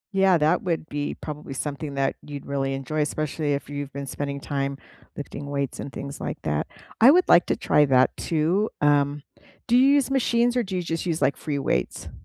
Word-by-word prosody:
Yeah, 190 Hz, -2 st, +5 dB
that 155 Hz, +4 st, +2 dB
would 165 Hz, -3 st, -2 dB
be 145 Hz, 0 st, -3 dB
probably 150 Hz, -2 st, -7 dB
something 145 Hz, +1 st, -4 dB
that 135 Hz, 0 st, 0 dB
you'd 145 Hz, -1 st, -8 dB
really 135 Hz, -1 st, -1 dB
enjoy, 150 Hz, +3 st, -2 dB
especially 150 Hz, 0 st, -1 dB
if 140 Hz, -, -6 dB
you've 145 Hz, -1 st, -5 dB
been 140 Hz, +1 st, -5 dB
spending 140 Hz, +1 st, -4 dB
time 140 Hz, 0 st, -3 dB, 0.4 s
lifting 145 Hz, 0 st, -6 dB
weights 140 Hz, -2 st, -3 dB
and 140 Hz, -, -6 dB
things 140 Hz, +1 st, -7 dB
like -, -, -4 dB
that. -, -, -1 dB, 0.3 s
I 240 Hz, -, +9 dB
would 360 Hz, +4 st, +5 dB
like 175 Hz, -, +6 dB
to -, -, +1 dB
try 150 Hz, -, +3 dB
that 130 Hz, -1 st, +3 dB
too, 170 Hz, +7 st, 0 dB
um, 145 Hz, 0 st, +2 dB, 0.4 s
do 240 Hz, -, +2 dB
you 260 Hz, +2 st, +6 dB
use 280 Hz, -2 st, +2 dB
machines, 240 Hz, -2 st, +2 dB
or 245 Hz, -, +3 dB
do 190 Hz, -3 st, -4 dB
you 180 Hz, -, -1 dB
just 165 Hz, 0 st, -3 dB
use, 165 Hz, -2 st, -1 dB
like, -, -, +2 dB
free 145 Hz, -2 st, -3 dB
weights? 65 Hz, -, -2 dB
145 Hz, 205 wpm, -25 LUFS, 140-175 Hz, 0.4 s, I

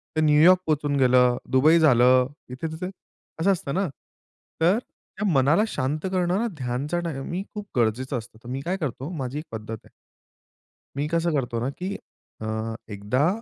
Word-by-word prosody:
ते 155 Hz, -, +2 dB
न्यूयॉर्क 155 Hz, +4 st, +6 dB
पोहचून 145 Hz, -2 st, 0 dB
गेलं, 125 Hz, -1 st, +5 dB
दुबई 155 Hz, +6 st, +5 dB
झालं 125 Hz, -3 st, +5 dB, 0.2 s
इथे 130 Hz, +6 st, -4 dB
तिथे. 180 Hz, +3 st, -5 dB, 0.5 s
असं 195 Hz, +3 st, +4 dB
असतं 165 Hz, -7 st, -2 dB
ना. 190 Hz, 0 st, +1 dB, 0.7 s
तर 180 Hz, +6 st, +5 dB, 0.4 s
त्या 210 Hz, -, -1 dB
मनाला 145 Hz, +8 st, +4 dB
शांत 150 Hz, 0 st, -2 dB
करणारा 185 Hz, +4 st, +1 dB
ध्यानचा 135 Hz, +6 st, -2 dB
टाइमही 170 Hz, +2 st, -4 dB
खूप 210 Hz, -1 st, -6 dB
गरजेचं 120 Hz, +3 st, +1 dB
असतं. 110 Hz, -1 st, -9 dB
तर 120 Hz, -, -9 dB
मी 135 Hz, +2 st, -3 dB
काय 185 Hz, +3 st, -1 dB
करतो 140 Hz, -2 st, -4 dB
माझी 140 Hz, -5 st, -4 dB
1 155 Hz, -, -8 dB
पद्धत 110 Hz, 0 st, -5 dB
आहे. -, -, -20 dB, 1.1 s
मी 145 Hz, +2 st, 0 dB
कसं 170 Hz, 0 st, +1 dB
करतो 120 Hz, -5 st, -1 dB
ना 125 Hz, -, -1 dB
की 185 Hz, +7 st, -5 dB, 0.5 s
अ, 110 Hz, +1 st, -3 dB, 0.2 s
एकदा 115 Hz, +9 st, +1 dB
145 Hz, 160 wpm, -25 LUFS, 125-170 Hz, 1.1 s, न्यूयॉर्क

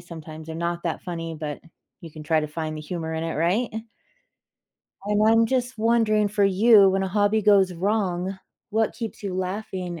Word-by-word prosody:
sometimes 160 Hz, -1 st, -10 dB
they're 160 Hz, -, -6 dB
not 170 Hz, +1 st, -3 dB
that 165 Hz, -, -3 dB
funny, 165 Hz, -2 st, -5 dB
but 150 Hz, -2 st, -5 dB, 0.4 s
you 165 Hz, -, -10 dB
can 155 Hz, 0 st, -10 dB
try 155 Hz, +1 st, +2 dB
to 150 Hz, -, -3 dB
find 155 Hz, +1 st, -5 dB
the 155 Hz, -, -6 dB
humor 160 Hz, 0 st, -5 dB
in 160 Hz, -, -3 dB
it, 165 Hz, -, -3 dB
right? 180 Hz, +10 st, +1 dB, 1.3 s
And 210 Hz, +1 st, +1 dB
I'm 225 Hz, 0 st, +5 dB
just 250 Hz, -1 st, -2 dB
wondering, 220 Hz, -2 st, +2 dB
for 205 Hz, 0 st, +1 dB
you, 200 Hz, +1 st, +6 dB
when 195 Hz, 0 st, 0 dB
a 190 Hz, -, -1 dB
hobby 205 Hz, +2 st, +1 dB
goes 195 Hz, -3 st, +4 dB
wrong, 190 Hz, 0 st, -1 dB, 0.3 s
what 220 Hz, +1 st, +1 dB
keeps 225 Hz, -3 st, -6 dB
you 195 Hz, -3 st, -4 dB
laughing, 185 Hz, -2 st, -4 dB
190 Hz, 185 wpm, -24 LUFS, 165-210 Hz, 1.3 s, you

